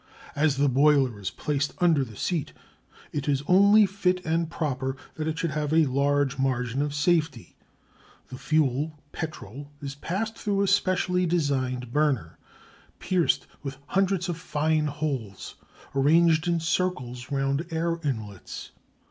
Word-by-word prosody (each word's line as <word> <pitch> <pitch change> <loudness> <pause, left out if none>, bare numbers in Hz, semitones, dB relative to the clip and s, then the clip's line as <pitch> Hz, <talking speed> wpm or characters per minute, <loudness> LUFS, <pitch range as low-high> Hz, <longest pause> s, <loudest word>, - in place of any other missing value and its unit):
As 145 -1 +2
the 145 +1 +3
boiler 135 -4 +3
is 100 - -3
placed 145 0 -2
under 165 -6 +3
the 115 -4 -9
seat 165 - -2 0.6
it 145 0 -2
is 140 -1 +1
only 200 +4 +6
fit 185 -2 0
and 165 +1 0
proper 135 -5 -2 0.2
that 155 0 -4
it 160 0 -2
should 165 -1 -1
have 150 0 -2
a 160 0 +5
large 140 0 +1
margin 130 -1 0
of 145 0 -2
safety. 150 -4 0 0.7
The 130 - -8
fuel, 150 0 0
petrol, 145 - -7
is 140 -2 -5
passed 195 +10 -3
through 200 -2 0
a - - +1
specially 185 -2 +2
designed 130 -7 -1
burner, 140 - 0 0.6
pierced 180 -3 +1 0.2
with 135 -1 -6
hundreds 190 -2 +1
of 175 -2 -3
fine 155 0 0
holes 135 -9 -4 0.4
arranged 160 +4 +4
in 170 -1 +2
circles 145 -8 -2
round 140 +3 0
air 165 +1 -1
inlets. 110 -9 -5
150 Hz, 140 wpm, -26 LUFS, 135-170 Hz, 0.7 s, only